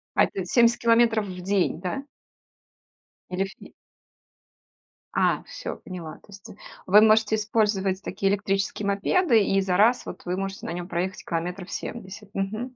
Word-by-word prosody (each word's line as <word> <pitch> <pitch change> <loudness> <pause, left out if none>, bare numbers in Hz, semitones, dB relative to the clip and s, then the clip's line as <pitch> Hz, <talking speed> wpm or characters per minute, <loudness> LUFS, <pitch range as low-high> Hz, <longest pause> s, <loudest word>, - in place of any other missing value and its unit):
А - - +5
это 190 - -5
70 235 +5 +4
километров 230 -2 +3
в 180 -1 -7
день, 190 -3 0
да? 200 +9 -3 1.3
Или 185 +1 -1
в 195 - -8
фи - - -14 1.4
А, - - +2
всё, - - -7
поняла. 170 -4 -8
То - - -24
есть 200 -1 -13 0.4
вы 205 +3 +7
можете 220 0 +4
использовать 210 -3 0
такие 195 0 -1
электрические 200 +1 -1
мопеды, 225 - +3
и 195 0 +2
за 185 -1 0
раз, 230 +4 +4
вот, - - -8
вы 180 +1 -2
можете 195 0 -4
на 165 - -4
нем 175 0 -5
проехать 190 +2 -3
километров 180 +2 -4
70. 205 -2 -7
Мгм. 220 +6 -3
200 Hz, 155 wpm, -25 LUFS, 185-220 Hz, 1.4 s, вы